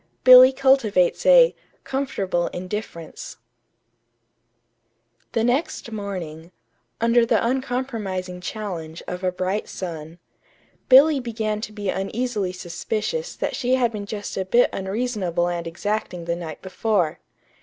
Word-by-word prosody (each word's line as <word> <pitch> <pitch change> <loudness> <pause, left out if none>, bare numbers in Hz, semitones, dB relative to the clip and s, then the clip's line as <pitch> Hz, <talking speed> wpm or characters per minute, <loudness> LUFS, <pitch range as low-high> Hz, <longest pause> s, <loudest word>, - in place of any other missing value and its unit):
BILLY 255 0 +10
CULTIVATES 260 -9 +2
A - - +7 0.3
"COMFORTABLE 195 -10 -2
INDIFFERENCE" 180 -2 -7 2.0
The 225 - +1
next 245 -1 -1
morning, 180 -6 -6 0.5
under 230 +1 +4
the 230 -2 +2
uncompromising 230 -8 -3
challenge 180 -5 -6
of 180 +1 -5
a 185 - +1
bright 185 +3 -2
sun, 165 -3 -7 0.7
Billy 280 +3 +7
began 220 -3 -3
to 215 - -6
be 205 -2 -4
uneasily 210 0 -2
suspicious 210 - -4
that - - -3
she 255 0 +1
had 245 -3 +1
been 205 -2 -6
just 205 -1 -6
a 190 - 0
bit 235 +6 +3
unreasonable 190 -4 -1
and 170 -1 -3
exacting 180 0 -3
the 170 0 -1
night 165 -3 -8
before. 185 -4 0
205 Hz, 120 wpm, -23 LUFS, 180-245 Hz, 2.0 s, BILLY